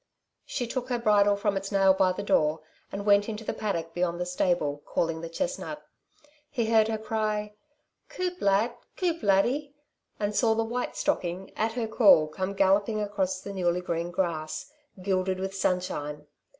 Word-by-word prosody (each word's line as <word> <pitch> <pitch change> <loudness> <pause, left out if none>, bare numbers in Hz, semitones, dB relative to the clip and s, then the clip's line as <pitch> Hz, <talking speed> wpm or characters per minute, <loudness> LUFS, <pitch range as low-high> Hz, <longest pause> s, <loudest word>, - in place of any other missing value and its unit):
She 250 - -2
took 250 +2 -4
her 245 - +1
bridle 205 -3 +4
from 200 0 0
its 195 +1 -3
nail 195 -1 +5
by 190 -1 +3
the 195 +2 -4
door, 155 -5 +2 0.3
and 200 +1 -5
went 205 +1 +4
into 220 0 -5
the - - -2
paddock 165 -6 -3
beyond 175 -1 -1
the 180 - -1
stable, 175 -5 0
calling 165 -1 -1
the 165 - -6
chestnut. - - -4 0.6
He 230 -4 -1
heard 220 -1 +5
her 220 -1 -1
cry: 215 -1 -2 0.6
"Coup 360 -1 -3
lad! 200 +4 +2 0.2
coup 340 -3 0
laddie!" 250 +9 +2 0.4
and 205 0 -1
saw 225 0 +3
the 225 - +1
white 245 +2 -3
stocking, 180 +2 -1
at 225 +1 0
her 235 -1 -1
call, 205 -9 +6
come 190 +5 -4
galloping 200 +3 +3
across 195 -3 -1
the 200 - -7
newly 180 -2 0
green 170 -1 -2
grass, 170 - -3 0.3
gilded 185 -1 0
with 190 0 -3
sunshine. 150 -6 -2
200 Hz, 170 wpm, -28 LUFS, 180-220 Hz, 0.6 s, call